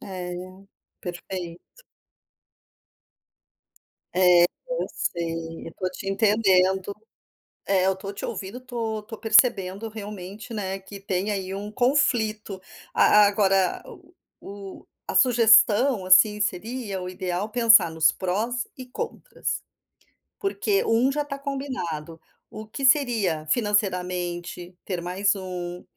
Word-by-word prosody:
É, 180 -1 -7 0.5
perfeito. 175 - -8 2.3
É, 180 -1 +6 0.2
eu - - -2
sei, 165 -1 -4
eu 165 - -6
estou 185 +2 -4
te 195 - -9
entendendo. 195 -2 +2 0.7
É, 190 -1 +2
eu 190 - +3
estou 195 +1 -7
te 200 - -6
ouvindo, 195 +5 -6
estou 235 -4 -4
estou 210 +2 -10
percebendo, 220 -2 +3
realmente, 210 0 -8
né, 195 -3 -3
que 195 +1 -11
tem 195 +1 -2
aí 190 -2 -3
um 205 +2 -6
conflito. 220 -6 0 0.3
A 210 0 +6
agora, 195 -2 +2
o - - -15 0.3
o 200 -1 -10 0.2
a - - -4
sugestão, 225 -1 +5
assim, 210 +3 +6
seria 210 +1 -3
o 180 - -5
ideal 185 +1 -3
pensar 230 -6 +6
nos 160 -1 +3
prós 220 +6 -2
e 255 - -9
contras. 455 - -5 0.8
Porque 395 0 0
1 235 +4 +3
já 295 +2 -1
está 280 -1 -6
combinado, 255 - -5 0.3
o 215 0 -9
que 275 +6 -7
seria 230 - +2
financeiramente 180 -4 -1
ter 180 -3 -3
mais 190 +3 0
1, 180 -2 -6
200 Hz, 120 wpm, -25 LUFS, 180-225 Hz, 2.3 s, É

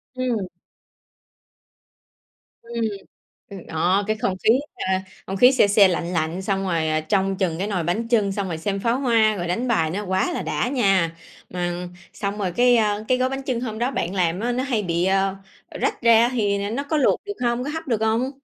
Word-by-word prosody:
Ừm. 245 -6 -1 2.1
Ừm. 235 0 -4 0.7
Ừm, 195 -3 -9
đó, 180 +5 +1
cái 215 0 0
không 200 -3 -1
khí - - +5 0.3
ha, 190 0 -1 0.2
không 195 - -4
khí 250 +6 +6
se 260 - +4
se, 200 -1 +6
lạnh 175 -1 -2
lạnh, 165 +2 -1
xong 195 0 -1
rồi 170 -3 0 0.3
trông 195 -1 +1
chừng 180 -4 -1
cái 195 - -1
nồi 190 -5 -1
bánh 180 +8 -2
chưng, 215 -5 +2
xong 200 0 -2
rồi 165 -3 -4
xem 195 +4 -2
pháo 230 +4 +1
hoa, 225 -5 +3
rồi 175 -2 -3
đánh 230 +9 -1
bài 165 -10 +1
nó 200 +5 -3
quá 185 0 0
là - - -3
đã 155 +8 -1
nha. 195 -10 +1 0.3
Ưm, 175 0 -3 0.2
xong 200 0 -4
rồi 190 -3 -2
cái, 245 +5 +4
ơ, 210 -1 +1
cái 255 - +3
gói 255 0 +1
bánh 270 +1 -4
chưng 255 -3 -2
hôm 220 -3 -4
đó 245 +3 0
bạn 185 -8 -3
làm 180 -1 0
á 240 +2 -1
nó 250 +1 -1
hay 250 -6 -1
bị, 170 -2 0
ơ, 195 0 +1 0.3
ờ, - - -9
rách - - -1
ra 235 0 +6
thì 205 -5 0
n - - -3
nó 275 - -1
có 310 +2 -1
luộc 285 - +2
được 410 - -4
hông? 240 +1 0
Có 290 - -3
hấp 320 +1 -5
được 230 -5 0
hông? 225 +4 +1
205 Hz, 220 wpm, -23 LUFS, 185-240 Hz, 2.1 s, khí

